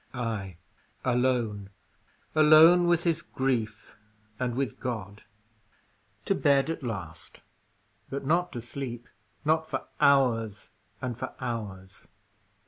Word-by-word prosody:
Ay, 110 -7 -4 0.5
alone. 120 -5 0 0.6
Alone 160 +3 +7
with 175 -1 +3
his 170 -1 +1
grief 115 -7 -3 0.4
and 125 -2 -1
with 130 -4 -2
God. 105 -5 -5 1.0
To - - +2
bed 140 +2 +2
at 165 - -5
last, 95 - -7 0.7
but 140 0 -5
not 175 +5 +1
to 120 -3 -5
sleep; 120 -1 -6 0.4
not 160 +1 +1
for - - -3
hours 125 -7 +2 0.3
and 125 -2 -2
for 130 +2 -6
hours. 100 -6 -6
125 Hz, 110 wpm, -28 LUFS, 110-140 Hz, 1.0 s, Alone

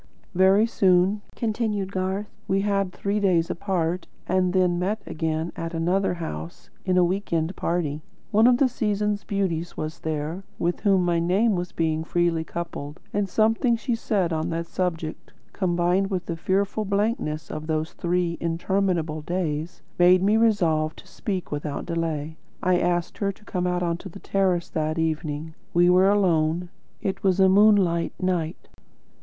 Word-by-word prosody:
"Very 190 +4 +5
soon," 195 -2 +3
continued 215 -4 -1
Garth, 190 +2 -2 0.2
"we 195 +1 +2
had 195 -2 0
three 200 +3 -1
days 175 -5 +2
apart, 180 -1 -1 0.2
and 185 0 +1
then 180 -2 +2
met 205 +4 -1
again 160 +1 -2
at 165 0 -5
another 180 +3 +1
house, 85 - -7
in 185 -1 +2
a 180 - +6
weekend 175 -2 -1
party. 155 -3 -1 0.3
One 220 +2 +5
of 250 -1 +5
the 270 - +4
season's 210 -3 -1
beauties 175 -4 -2
was 155 +2 -4
there, 160 +3 -3 0.2
with 175 +1 -1
whom 195 -3 +3
my 170 -1 +2
name 195 +7 +2
was 180 -1 -3
being 160 -1 0
freely 170 -1 +1
coupled, 160 -3 -6
and 205 -1 0
something 225 +4 +2
she 240 +2 -2
said 200 -6 0
on 160 +1 -1
that 165 0 -2
subject, 165 -3 -3 0.2
combined 180 +1 +1
with 185 -3 -2
the 170 - -3
fearful 195 +5 0
blankness 200 -7 -1
of 155 0 -5
those 155 0 -1
three 175 -1 -1
interminable 170 -2 0
days, 165 0 -3 0.2
made 180 +1 +6
me 205 +2 +4
resolve 170 -9 +2
to - - -14
speak 190 -4 -4
without 145 -1 -3
delay. 160 -2 -3 0.3
I 180 0 +3
asked 175 -1 -1
her 200 -1 +1
to 210 +2 -20
come 180 -4 -1
out 180 0 0
on 170 -1 0
to 190 - -9
the 185 - -10
terrace 185 -4 0
that 155 -1 -1
evening. 160 -1 -2 0.2
We 175 +1 +5
were 185 +2 +5
alone. 175 -4 +2 0.3
It 190 - -2
was 190 -1 +2
a 190 - +6
moonlight 190 -4 +4
night." 180 -3 -2
180 Hz, 160 wpm, -25 LUFS, 165-195 Hz, 0.3 s, a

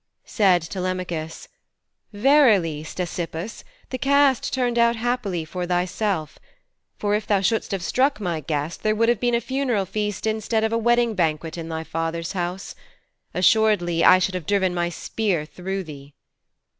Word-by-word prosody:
Said 185 -6 +3
Telemachus, 180 -2 -4 0.6
'Verily, 205 - +3
Ctesippus, 175 +3 -5 0.3
the 255 - -3
cast 275 -1 +3
turned 245 -2 0
out 235 0 +4
happily 225 -8 -2
for 180 +2 -4
thyself. 180 -2 -1 0.6
For 205 0 -1
if 210 0 -1
thou 205 -3 +3
shouldst 215 +3 0
have 195 -4 -3
struck 265 +5 +1
my 175 -5 -2
guest, 150 +2 -3
there 215 0 +1
would 230 +2 +2
have 240 -3 +2
been 240 -1 +1
a - - +2
funeral 250 -4 -1
feast 210 +2 -3
instead 220 0 0
of 220 0 0
a - - +2
wedding 240 0 +2
banquet 160 -3 -1
in 165 -1 -6
thy 160 0 -4
father's 165 +1 -3
house. 180 0 -4 0.6
Assuredly 180 -4 +3
I 185 - +8
should 185 +1 0
have 180 -4 -5
driven 190 -3 +1
my 175 -1 0
spear 180 -2 -2
through 190 +4 -5
thee.' 145 -3 -11
190 Hz, 155 wpm, -23 LUFS, 170-225 Hz, 0.6 s, I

